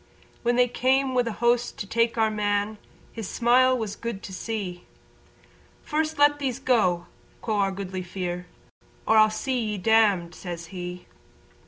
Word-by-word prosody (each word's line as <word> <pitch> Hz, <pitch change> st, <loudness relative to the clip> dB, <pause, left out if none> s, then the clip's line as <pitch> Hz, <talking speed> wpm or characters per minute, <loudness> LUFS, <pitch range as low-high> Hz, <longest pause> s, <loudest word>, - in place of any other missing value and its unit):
When 240 Hz, 0 st, +1 dB
they 250 Hz, 0 st, +4 dB
came 260 Hz, +2 st, +1 dB
wi' 250 Hz, -, +3 dB
a -, -, -1 dB
host 240 Hz, +2 st, +1 dB
to -, -, -4 dB
take 230 Hz, +3 st, +1 dB
Our 220 Hz, -1 st, +3 dB
Man 205 Hz, 0 st, -1 dB, 0.3 s
His 225 Hz, -4 st, -6 dB
smile 255 Hz, +3 st, +3 dB
was 215 Hz, -4 st, -4 dB
good 230 Hz, -3 st, -5 dB
to 190 Hz, -, -8 dB
see, 185 Hz, -3 st, -5 dB, 1.0 s
"First 310 Hz, +1 st, -1 dB
let 290 Hz, 0 st, +4 dB
these 260 Hz, -4 st, -2 dB
go!" 215 Hz, -10 st, +2 dB, 0.4 s
quo' 220 Hz, -2 st, -1 dB
our 195 Hz, -1 st, +2 dB
Goodly 190 Hz, -1 st, -5 dB
Fere, 180 Hz, -1 st, -5 dB, 0.6 s
"Or 220 Hz, -, +4 dB
I'll 215 Hz, 0 st, +7 dB
see 255 Hz, +4 st, -2 dB
ye 215 Hz, -3 st, -2 dB
damned," 200 Hz, -4 st, +3 dB
says 175 Hz, -2 st, -7 dB
he. 180 Hz, 0 st, -6 dB
220 Hz, 160 wpm, -25 LUFS, 190-245 Hz, 1.0 s, I'll